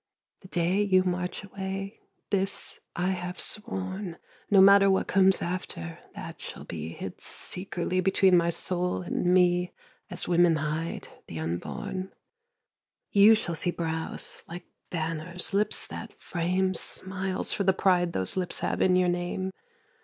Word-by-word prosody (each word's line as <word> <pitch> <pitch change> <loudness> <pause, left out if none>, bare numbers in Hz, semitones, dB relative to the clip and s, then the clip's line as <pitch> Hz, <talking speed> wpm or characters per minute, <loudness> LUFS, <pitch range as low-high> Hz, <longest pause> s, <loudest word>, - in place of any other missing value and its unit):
The 190 - -14
day 180 +2 +1
you 190 -2 +4
march 180 +1 -2
away 195 +1 -5 0.3
this 195 -1 0 0.2
I 180 +2 0
have 180 0 -4
sworn, 190 -3 -3 0.3
No 200 - +6
matter 195 +1 +8
what 190 - +2
comes 190 -1 +4
after, 170 - -4 0.2
that - - -8
shall - - -5
be 80 -1 -6
Hid 90 +2 -7
secretly 180 0 -1
between 190 0 +4
my 170 -1 +4
soul 180 +1 0
and 180 0 0
me 180 0 +3 0.4
As - - -2
women 175 -1 +4
hide 155 +2 -3 0.2
the 80 - -7
unborn 85 - -4 1.0
You 210 +2 +8
shall 185 -5 -2
see 165 +2 0
brows 160 -2 -3
like 175 +1 -8 0.2
banners, 165 +2 -3
lips 210 +1 +1
that - - -9
frame 185 +2 0
Smiles, 190 +1 -2
for 200 - 0
the 190 - +5
pride 180 -2 +2
those 95 0 -2
lips 180 -2 -1
have - - -1
in 185 -1 +4
your 180 0 +4
name. 175 +2 -2
180 Hz, 145 wpm, -28 LUFS, 170-190 Hz, 1.0 s, matter